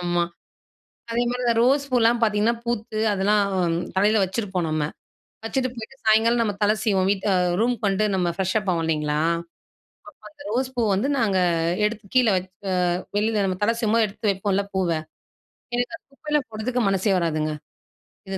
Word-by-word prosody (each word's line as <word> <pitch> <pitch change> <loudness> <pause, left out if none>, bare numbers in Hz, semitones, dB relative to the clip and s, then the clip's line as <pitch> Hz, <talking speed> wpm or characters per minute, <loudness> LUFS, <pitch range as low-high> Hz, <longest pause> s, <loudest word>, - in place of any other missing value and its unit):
ஆமா. 175 -1 +1 0.9
அதே 235 +1 +1
மாரி 245 +1 -3
இந்த 235 - +3
ரோஸ் 275 +3 +3
பூவல்லாம் 235 -1 +3
பாத்தீங்கன்னா, 215 +2 +2
பூத்து 220 -2 -3
அதெல்லாம் 205 +2 +2 0.5
தலையில 210 +2 +3
வச்சுருப்போம் 190 -3 -2
நம்ம, 155 -1 0 0.6
வச்சுட்டு 255 +2 -1
போய்ட்டு 235 +3 -9
சாயங்காலம் 225 +2 +4
நம்ம 210 -3 0
தலை 210 +1 +4
சீவோம் 190 -3 +2
வீட் 200 -1 -1 0.3
ரூம்க்கு 235 -2 0
வந்துட்டு 200 +2 +1
நம்ம 180 -2 +1
ஃப்ரெஷ் 190 +1 -1
அப் 200 -2 -4
ஆவோம் 170 -2 0
இல்லைங்களா? 150 -2 0 0.2
அப்ப 170 - -23 0.7
அந்த 190 - -14
ரோஸ் 255 +3 -1
பூ 240 - +1
வந்து 215 +9 0
நாங்க 205 -6 +2 0.5
எடுத்து 210 0 -4
கீழ 250 -2 +5
வச்சு 185 0 -4 0.2
அ 185 - +1 0.4
வெளியில 210 -1 +1
நம்ம 185 -1 -2
தல 230 +2 +2
சீவும் 220 -1 +1
போது 225 -2 +4
எடுத்து 205 +1 -1
வைப்போம்ல 200 0 0
பூவ, 185 -2 +1 0.9
எனக்கு 245 +5 -1
அந்த - - -28
குப்பையெல்லாம் 300 -1 -2
போடுறதுக்கு 240 +3 -2
மனசே 195 +1 +1
வராதுங்க. 155 -2 -1 0.8
இது 190 - -3
210 Hz, 165 wpm, -23 LUFS, 190-235 Hz, 0.9 s, கீழ